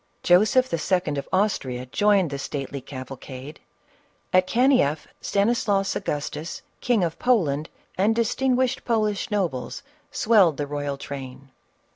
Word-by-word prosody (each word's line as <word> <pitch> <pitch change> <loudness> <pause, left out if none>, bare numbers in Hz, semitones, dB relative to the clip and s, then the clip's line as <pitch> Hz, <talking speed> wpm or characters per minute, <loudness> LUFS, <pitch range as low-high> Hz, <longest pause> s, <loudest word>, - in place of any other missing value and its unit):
Joseph 215 +8 +4
II. 165 -1 0
of - - -8
Austria 135 -11 0
joined 195 +3 +2
the 140 - -4
stately 140 -1 -5
cavalcade; 130 +1 -9 0.7
at 185 0 +4
Kanieff, 235 - +3 0.2
Stanislaus 200 -2 +1
Agustus, 150 -2 -4 0.2
King 240 -6 +2
of 165 -2 -2
Poland, 155 - +1 0.3
and 215 +4 +3
distinguished 255 +2 +1
Polish 215 -4 0
nobles, 180 - -2 0.3
swelled 200 - +4
the 145 - -2
royal 145 -1 -3
train. 135 -1 -8
175 Hz, 115 wpm, -24 LUFS, 140-215 Hz, 0.7 s, Joseph